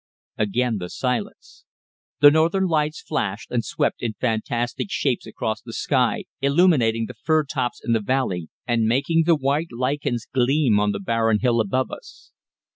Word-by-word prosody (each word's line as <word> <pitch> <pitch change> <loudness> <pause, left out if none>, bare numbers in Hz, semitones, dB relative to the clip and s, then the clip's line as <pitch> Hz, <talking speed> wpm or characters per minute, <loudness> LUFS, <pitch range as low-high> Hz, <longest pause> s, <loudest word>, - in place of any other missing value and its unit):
Again 110 +1 0
the 90 -1 -6
silence. 170 - -4 0.6
The 145 0 +9
northern 165 +5 +2
lights 155 -3 0
flashed 105 -9 -3
and 120 -2 0
swept - - -1
in 115 -2 -2
fantastic 120 - -2
shapes 130 - -1
across 110 0 -3
the 115 - -10
sky, 125 -2 0 0.2
illuminating 140 -7 +3
the - - -8
fir 155 -1 +1
tops 135 -4 -3
in 115 - +1
the 115 - +3
valley 100 -8 -1 0.2
and 115 -2 +1
making 145 +7 +2
the 170 - +6
white 145 +3 -1
lichens 125 -1 -2
gleam 130 -3 +2
on 105 0 +1
the 100 - -4
barren 115 +1 +1
hill 120 -2 +3
above 130 +5 -1
us. - - -12
125 Hz, 160 wpm, -23 LUFS, 115-145 Hz, 0.6 s, The